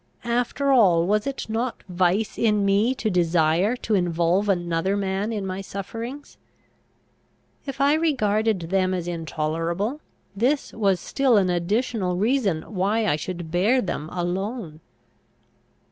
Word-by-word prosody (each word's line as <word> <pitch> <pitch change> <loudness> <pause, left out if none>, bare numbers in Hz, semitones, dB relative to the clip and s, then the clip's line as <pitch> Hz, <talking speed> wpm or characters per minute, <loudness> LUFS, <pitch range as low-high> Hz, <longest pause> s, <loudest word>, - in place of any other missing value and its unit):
After 245 +4 0
all, 185 -10 +5
was 210 +5 +1
it 275 - -4
not 230 +3 -3
vice 185 +3 +1
in 210 -3 +2
me 205 +6 +2
to 220 -5 -1
desire 175 +4 +2
to 220 - 0
involve 175 +1 +1
another 175 +1 0
man 195 +2 -1
in 210 -3 -3
my 190 +1 -4
sufferings? 230 +9 -7 1.3
If 275 - -5
I 280 +1 +4
regarded 215 - +1
them 185 -1 +2
as 175 -1 -4
intolerable, 170 - -2 0.3
this 260 +8 0
was 195 -4 +1
still 265 +1 +2
an 185 -3 +2
additional 185 +2 0
reason 205 -5 +1
why 210 +3 0
I 170 - +2
should 170 +1 -6
bear 205 +9 +3
them 160 -8 -3
alone. 180 0 -3
195 Hz, 130 wpm, -24 LUFS, 175-230 Hz, 1.3 s, all